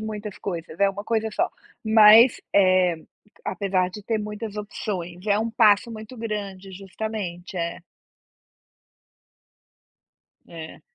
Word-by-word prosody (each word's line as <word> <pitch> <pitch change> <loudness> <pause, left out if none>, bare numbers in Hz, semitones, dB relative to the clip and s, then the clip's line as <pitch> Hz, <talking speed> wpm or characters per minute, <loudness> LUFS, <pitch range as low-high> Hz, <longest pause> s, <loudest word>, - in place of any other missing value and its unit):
muitas 210 -1 -6
coisas, 170 -3 -6
é 200 0 +4
uma 200 +1 -8
coisa 225 -1 0
só, 350 +8 0 0.4
mas, 220 +2 +7
eh, 185 -3 +4 0.5
apesar 190 -3 0
de 210 +3 -10
ter 220 +2 -1
muitas 210 0 -6
opções, 190 -3 -5
é 205 0 +3
um 225 +1 -1
passo 220 -1 +4
muito 220 +2 -9
grande 200 -4 -5
Justamente, 195 -1 -6
é. 170 0 -3 2.7
É. 160 -1 -10
205 Hz, 115 wpm, -24 LUFS, 185-220 Hz, 2.7 s, mas